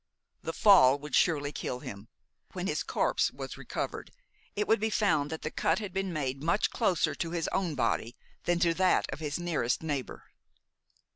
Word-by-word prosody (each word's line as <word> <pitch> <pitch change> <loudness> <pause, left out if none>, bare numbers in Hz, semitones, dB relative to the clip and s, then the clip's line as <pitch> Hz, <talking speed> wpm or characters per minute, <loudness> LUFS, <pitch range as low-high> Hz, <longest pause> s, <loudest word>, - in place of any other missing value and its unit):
The 165 - -3
fall 145 -9 +6
would 145 -1 -10
surely 145 -4 +2
kill 125 -3 -4
him. 100 +2 -8 0.5
When - - -4
his - - -1
corpse - - +1
was - - -7
recovered, - - -5 0.4
it 210 - -1
would 225 - +4
be 220 +1 0
found 195 -9 +1
that 160 0 -6
the 155 - -3
cut 165 - +1
had 205 -3 -5
been 195 -1 -1
made 135 -4 -3
much 170 +7 +1
closer 190 -8 +1
to 165 - -3
his 170 -1 -2
own 175 -6 -1
body 120 -2 -1 0.3
than 175 0 +2
to 170 -2 +4
that 185 +2 +3
of - - -7
his 150 -2 -3
nearest 160 -8 -1
neighbor. 145 -5 -4
160 Hz, 185 wpm, -30 LUFS, 145-185 Hz, 0.5 s, fall